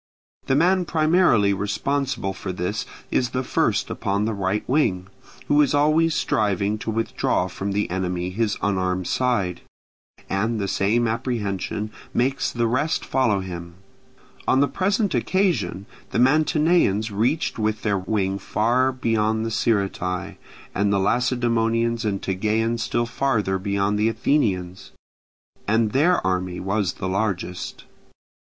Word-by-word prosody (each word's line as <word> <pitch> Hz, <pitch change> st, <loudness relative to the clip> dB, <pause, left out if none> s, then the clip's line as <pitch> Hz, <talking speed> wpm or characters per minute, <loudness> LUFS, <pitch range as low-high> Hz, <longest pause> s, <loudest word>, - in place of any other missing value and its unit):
The 135 Hz, -, +2 dB
man 180 Hz, +4 st, +3 dB
primarily 155 Hz, -, +3 dB
responsible 105 Hz, +2 st, -1 dB
for 95 Hz, 0 st, -5 dB
this 90 Hz, +4 st, -3 dB, 0.2 s
is 125 Hz, -, +1 dB
the 130 Hz, -, 0 dB
first -, -, 0 dB
upon 100 Hz, +2 st, -1 dB
the 110 Hz, -, -1 dB
right 100 Hz, +1 st, -2 dB
wing, 95 Hz, -10 st, +1 dB, 0.4 s
who 145 Hz, +1 st, +4 dB
is 145 Hz, -1 st, +2 dB
always 155 Hz, +2 st, +3 dB
striving 105 Hz, 0 st, 0 dB
to 115 Hz, -, -5 dB
withdraw 110 Hz, -4 st, 0 dB
from 95 Hz, +2 st, -4 dB
the 105 Hz, +1 st, 0 dB
enemy 90 Hz, -1 st, -2 dB
his 105 Hz, +1 st, -1 dB
unarmed 95 Hz, -2 st, 0 dB
side; 100 Hz, -9 st, 0 dB, 0.7 s
and 110 Hz, +4 st, -1 dB
the 100 Hz, -, -1 dB
same 115 Hz, +5 st, +1 dB
apprehension 110 Hz, -3 st, -2 dB, 0.2 s
makes 135 Hz, +3 st, +1 dB
the 120 Hz, -1 st, 0 dB
rest 130 Hz, +7 st, 0 dB
follow 115 Hz, -7 st, +1 dB
him. 85 Hz, -2 st, -7 dB, 0.7 s
On 130 Hz, -, +4 dB
the 140 Hz, -, +4 dB
present 200 Hz, +4 st, 0 dB
occasion 130 Hz, -, 0 dB, 0.2 s
the -, -, -3 dB
Mantineans 150 Hz, -, +3 dB
reached 115 Hz, +8 st, 0 dB
with 110 Hz, 0 st, -1 dB
their 100 Hz, -3 st, +1 dB
wing 95 Hz, 0 st, -1 dB
far 125 Hz, +6 st, +1 dB
beyond 110 Hz, -3 st, 0 dB
the 115 Hz, -, -3 dB
Sciritae, 95 Hz, -5 st, -1 dB, 0.4 s
and 100 Hz, +1 st, +1 dB
the 100 Hz, -, +2 dB
Lacedaemonians 115 Hz, 0 st, +1 dB
and 100 Hz, -2 st, -2 dB
Tegeans 110 Hz, +4 st, 0 dB
still 120 Hz, +1 st, 0 dB
farther 115 Hz, -6 st, 0 dB
beyond 100 Hz, +1 st, 0 dB
the 110 Hz, +1 st, +3 dB
Athenians, 95 Hz, -9 st, -1 dB, 0.7 s
as 110 Hz, +1 st, +2 dB
their 150 Hz, -, +2 dB
army 90 Hz, -1 st, -1 dB
was 95 Hz, -1 st, -1 dB
the 95 Hz, -, -5 dB
largest. 95 Hz, -2 st, -3 dB
110 Hz, 135 wpm, -23 LUFS, 95-125 Hz, 0.7 s, who